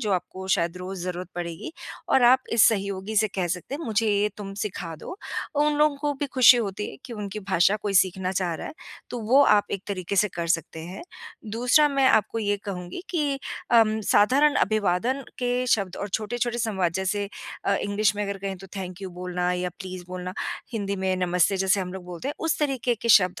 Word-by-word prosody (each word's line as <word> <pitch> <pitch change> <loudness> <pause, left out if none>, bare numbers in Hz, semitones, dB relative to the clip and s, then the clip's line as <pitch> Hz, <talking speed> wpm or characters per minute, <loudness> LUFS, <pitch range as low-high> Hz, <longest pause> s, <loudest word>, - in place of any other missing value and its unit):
जो 215 -5 -1
आपको 185 +1 -3
शायद 170 +1 -1
रोज़ 185 +1 -6
ज़रूरत 180 0 -4
पड़ेगी 170 - -5 0.4
और 265 - +4
आप 255 +2 +6
इस 230 - +5
सहयोगी 200 0 -2
से 215 0 +4
कह 185 -2 0
सकते 180 +9 -4
हैं 320 - -5
मुझे 225 -1 +1
ये 205 0 +2
तुम 200 -2 -7
सिखा 180 -5 -4
दो। 360 - -8 0.4
उन 295 +1 +3
लोगों 300 -1 +3
को 290 0 -1
भी 290 - 0
खुशी 255 -2 +7
होती 210 -2 -2
है - - -11
कि 245 - -8
उनकी 210 -1 -5
भाषा 190 +1 +3
कोई 205 -1 -2
सीखना 185 0 +2
चाह 180 -3 -1
रहा - - -6
है, - - -7 0.4
तो 245 - -4
वो 255 +6 +5
आप 205 -5 +4
एक 195 - -3
तरीके 195 -1 -3
से 210 +2 +4
कर 170 -1 -3
सकते 165 -1 -1
हैं। 185 - -8 0.5
दूसरा 250 +6 +4
मैं 275 -2 +2
आपको 220 +2 +2
ये 205 -1 0
कहूँगी 180 - -6
कि 295 -5 0 0.4
अ, 230 -1 +7 0.3
साधारण 280 +8 +5
अभिवादन 215 +6 +1 0.2
के 245 -1 0 0.2
शब्द 195 -6 +1
और 205 - -4
छोटे-छोटे 240 +4 -2
संवाद 190 -7 0
जैसे 195 +2 -1 0.4
अ, 200 - +2
इंग्लिश 205 +1 +1
में 210 - -1
अगर 200 -1 -3
कहें 195 -1 -4
तो 195 - -11
थैंक 185 0 -6
यू 190 - -4
बोलना 180 0 -2
या 180 0 -1
प्लीज़ 185 -2 -7
बोलना, 180 0 -5 0.4
हिंदी 200 -3 -2
में 190 0 0
नमस्ते 180 +1 +2
जैसे 190 +1 +2
हम 180 0 -4
लोग 190 -2 -7
बोलते 180 +9 -6
हैं, 295 - -3
उस 325 -1 0
तरीके 265 -5 0
के 235 +1 -5
शब्द 185 -5 +5
200 Hz, 210 wpm, -25 LUFS, 185-235 Hz, 0.5 s, खुशी